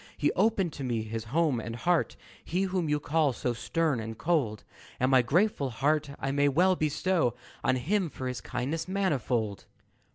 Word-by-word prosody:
"He 145 - +2
opened 195 -4 +1
to 140 - -6
me 120 -4 -1
his 110 +1 -5
home 145 +1 +1
and 115 +1 -5
heart 170 +8 +1 0.3
He 180 +4 -1
whom 185 -4 -1
you 150 0 +2
call 150 -2 +1
so 120 0 -2
stern 155 +2 0
and 110 0 -6
cold 140 -11 0 0.4
And 130 +2 +2
my 130 -1 +6
grateful 150 - +1
heart 145 +5 +1
I 135 - -1
may 145 +1 +3
well 180 +6 +4
bestow 155 -4 +1 0.3
On 130 - +3
him 180 +8 0
for 130 -1 -5
his 125 -1 -4
kindness 160 +6 -3
manifold." 130 - -1
145 Hz, 175 wpm, -29 LUFS, 125-170 Hz, 0.4 s, my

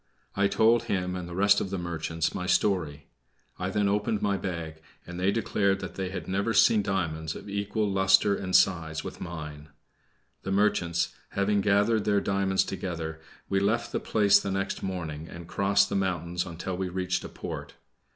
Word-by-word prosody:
I 100 0 +3
told 115 +3 +3
him 90 -4 -1
and 90 -1 -5
the 85 - -7
rest 100 +1 +4
of 95 - -3
the 100 - -3
merchants 80 -2 -2
my 90 - -4
story. 80 -9 +1 0.5
I 95 0 -1
then 105 +1 +1
opened 105 +1 0
my 100 -1 +1
bag, 85 -4 -5 0.2
and 90 0 -7
they 95 +2 +2
declared 100 -3 +1
that - - -6
they 95 -1 -3
had 95 - -6
never 100 +4 0
seen 110 - +5
diamonds 80 -5 -2
of - - -9
equal 100 +1 -1
luster 95 +1 +4
and 95 -2 -2
size 80 -4 +2
with - - -8
mine. 75 -3 -7 0.7
The 95 - -4
merchants 95 -4 +1 0.2
having 100 +1 +2
gathered 105 +2 +2
their 100 -1 +3
diamonds 95 -1 +1
together, 80 -4 -5 0.3
we 95 - +1
left 110 +4 0
the - - -1
place 105 -2 +4
the 100 - -4
next 95 0 -2
morning, 80 -5 -4
and 85 0 -9
crossed 100 +2 +2
the - - -2
mountains 90 -2 -1
until 90 +2 -5
we 95 0 -2
reached 90 0 -2
a - - -7
port. - - -7
95 Hz, 180 wpm, -28 LUFS, 85-100 Hz, 0.7 s, seen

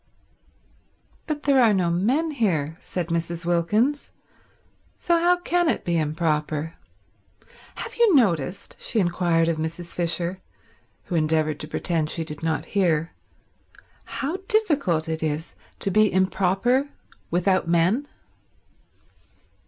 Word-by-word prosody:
"But 300 -2 -3
there 275 -2 +4
are 220 -4 +5
no 175 -3 +1
men 255 - +1
here," 165 - 0
said 175 -2 -4
Mrs. 170 0 -2
Wilkins, 210 - +1 0.9
"so 345 - +1
how 350 +1 +4
can 350 -1 +1
it - - -1
be 175 - 0
improper? 155 0 -1 1.0
Have - - -6
you 460 -7 +5
noticed," 180 - +1
she 230 - 0
inquired 175 -2 +2
of 165 -1 0
Mrs. 165 +2 -5
Fisher, 175 +2 -1 0.6
who - - -7
endeavoured 155 -1 +1
to 150 - -5
pretend 160 -1 -1
she 165 - -2
did 150 -2 -8
not 160 -1 -1
hear, 165 -5 +1 0.9
"How 295 +7 -3
difficult 285 - +1
it 160 0 -3
is 155 +1 -3 0.3
to 195 - 0
be 215 +1 +4
improper 195 +8 +1 0.4
without 180 +1 +1
men?" 175 +12 +2
175 Hz, 120 wpm, -24 LUFS, 165-235 Hz, 1.0 s, are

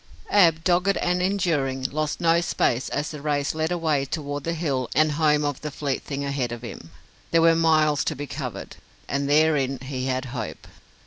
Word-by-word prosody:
Ab, 165 -5 +5
dogged 180 +3 +2
and 180 0 0
enduring, 165 -9 0
lost 155 0 -2
no 170 0 +3
space 130 -6 0
as 145 +2 -2
the 150 -2 -8
race 145 -1 0
led 160 +1 -1
away 160 -5 +1
toward 145 0 -4
the 165 - -1
hill 140 -7 -1
and 155 +1 +4
home 150 -1 +2
of 145 -2 -3
the 150 - -4
fleet 140 -2 -3
thing 140 0 -4
ahead 140 -3 -2
of 120 0 -6
him. 100 -8 -8 0.4
There 165 0 +3
were 165 0 +6
miles 155 -2 +3
to 155 - -1
be 145 +2 -5
covered, - - -6 0.3
and 140 0 -1
therein 145 -3 +3
he 130 0 -4
had 130 0 -1
hope. 110 -5 -6
150 Hz, 190 wpm, -24 LUFS, 140-165 Hz, 0.4 s, were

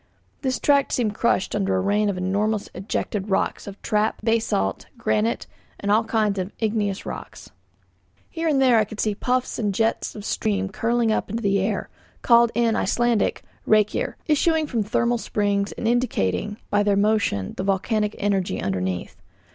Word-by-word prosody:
This 260 -2 0
tract 280 -1 +3
seemed 220 -4 0
crushed 235 -3 +1
under 195 -2 +1
a - - +2
rain 205 +2 +1
of 195 - -2
enormous 205 +3 -1
ejected 195 +1 -3
rocks 190 - -1
of 200 0 -8
trap, 215 0 0
basalt, 225 - 0
granite, 110 -3 0 0.3
and 200 - -1
all 220 +2 +3
kinds 215 -3 +1
of 185 +2 -3
igneous 210 -3 -1
rocks. - - -8 0.8
Here 330 0 -3
and 290 -4 +3
there 255 -4 +5
I - - +4
could 210 0 -9
see 215 - +1
puffs 250 +5 -1
and 205 -4 -1
jets 225 +2 0
of 210 -1 -8
steam 200 -3 -1
curling 230 +2 +1
up 215 - -1
into 230 +3 -3
the 200 -1 +2
air, 200 +2 -1 0.4
called 235 -1 +5
in 230 -1 +2
Icelandic 235 +1 +1 0.2
'reykir,' 215 -1 +2
issuing 315 +1 +2
from 240 -6 -1
thermal 235 +3 +1
springs, 205 -2 0
and 225 - -3
indicating 210 - 0
by 205 - +3
their 205 -1 +2
motion 200 - +1
the - - -3
volcanic 210 +2 0
energy 195 -2 0
underneath. 95 -2 -3
210 Hz, 165 wpm, -23 LUFS, 195-230 Hz, 0.8 s, there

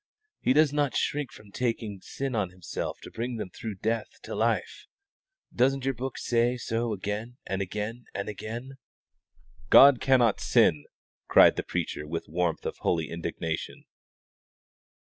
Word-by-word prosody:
He 130 - +3
does 150 0 +4
not 145 -4 +1
shrink 145 -3 -1
from 105 -1 -15
taking 115 -4 -2
sin 135 +5 -4
on 105 -5 0
Himself 90 -1 -5
to - - -10
bring 120 +2 -3
them 105 -5 -5
through 110 -3 -6
death 110 +4 -2
to - - -6
life. - - -1 0.7
Doesn't 135 +2 +2
your 135 - +1
book 130 +1 -5
say 120 +1 +1
so 115 0 -2
again 105 +4 -4
and 95 0 -2
again 105 +5 -4
and 100 - -3
again?" 115 +5 -6 0.9
"God 140 -2 +8
cannot 125 -5 +4
sin!" 75 -1 +3 0.4
cried - - +7
the - - -1
preacher, 75 - -3
with 80 +2 -4
the - - -19
warmth 85 -1 -1
of - - -3
holy 80 -4 0
indignation. 85 -1 -4
115 Hz, 150 wpm, -28 LUFS, 95-125 Hz, 0.9 s, God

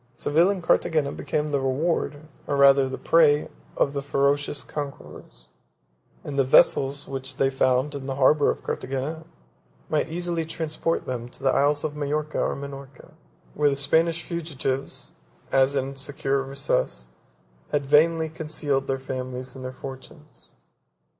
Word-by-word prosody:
12 - - -27
Seville 165 +5 +3
and 195 -3 -2
Carthagena 155 -4 +2
became 150 0 -2
the 140 -1 +1
reward, 145 +2 -1 0.2
or 145 - 0
rather 140 -1 +6
the 130 - -4
prey, 155 -2 +4 0.3
of 140 - +2
the 140 - -2
ferocious 140 0 0
conquerors; 140 - -8 0.7
and 140 -1 -3
the - - +5
vessels 135 +2 +4
which 135 0 -5
they 135 0 +2
found 130 +2 +1
in 140 -1 -6
the 135 - -2
harbor 140 +2 +4
of - - -2
Carthagena 140 +5 -4 0.6
might 155 +1 0
easily 170 0 -2
transport 160 0 -2
them 120 -2 -4
to - - -13
the 135 - +4
Isles 145 +2 +2
of 150 -1 -3
Majorca 150 +1 -1
and - - -5
Minorca, 140 -2 -10 0.4
where 150 -1 +3
the 140 - 0
Spanish 165 +4 +2
fugitives, 145 -6 -2 0.4
as 135 +1 +3
in 135 -1 0
a 135 - -9
secure 135 0 -1
recess, 135 - -2 0.6
had 145 -1 0
vainly 160 +3 +4
concealed 150 -3 -2
their 135 - 0
families 130 -1 -5
and 130 - -8
their 130 - -4
fortunes. 135 +4 -11
140 Hz, 155 wpm, -25 LUFS, 135-155 Hz, 0.7 s, rather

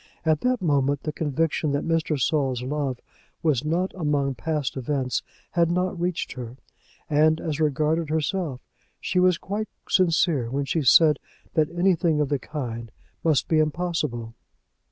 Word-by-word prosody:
At 155 -2 +2
that 250 -4 +1
moment 140 -3 +1
the 155 - -3
conviction 155 0 0
that 140 - -1
Mr. 160 -3 0
Saul's 130 -2 +1
love 135 -2 -2 0.4
was 150 -6 +2
not 170 +5 0
among 145 -5 0
past 150 0 -2
events 130 -1 -1 0.3
had 170 -2 +2
not 180 0 0
reached 180 -1 -1
her; 125 -1 -7 0.5
and 155 +1 +3
as 155 -2 -3
regarded 155 +1 +1
herself, 155 -3 -1 0.4
she 180 - 0
was 180 -1 +4
quite 210 +4 -4 0.2
sincere 165 -8 +2
when 140 +3 -1
she 155 +4 0
said 150 +2 +6 0.3
that 155 -2 +2
anything 175 -3 +2
of 150 -2 +1
the 145 -2 0
kind 115 -7 -5 0.3
must 155 -5 +2
be 160 - +3
impossible. 150 -8 -1
155 Hz, 150 wpm, -25 LUFS, 140-165 Hz, 0.5 s, said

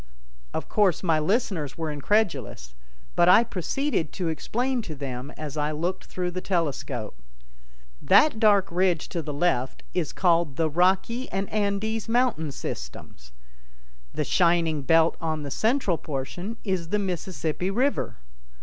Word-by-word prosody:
Of - - -4
course 195 -5 +2
my 165 -3 +3
listeners 165 - -1
were 160 -2 -2
incredulous, 145 - -1 0.4
but 175 0 +5
I 220 - +8
proceeded 230 - -2
to 175 -3 -2
explain 245 +10 -1
to 160 -8 -7
them 130 -1 -5
as 155 -1 -6
I 150 0 0
looked 170 +5 -3
through 180 -1 -3
the 185 +1 -4
telescope: 160 - -2 0.8
"That 220 +5 +5
dark 205 -4 +4
ridge 175 -2 +1
to 170 - -3
the 150 - -5
left 140 -5 0
is 175 -5 -1
called 170 -6 +2
'the 160 +1 0
Rocky 190 - +1
and 195 +1 -1
Andes 215 +1 -1
Mountain 230 - +1
Systems'. - - -8 0.8
The - - -2
shining 170 -3 +2
belt 165 +3 +3
on 155 -2 -2
the 140 - -6
central 220 - +1
portion 175 +10 -5
is 185 -5 -2
the 210 - +1
'Mississippi 180 -2 -2
River'. 255 +8 0
175 Hz, 140 wpm, -26 LUFS, 155-200 Hz, 0.8 s, I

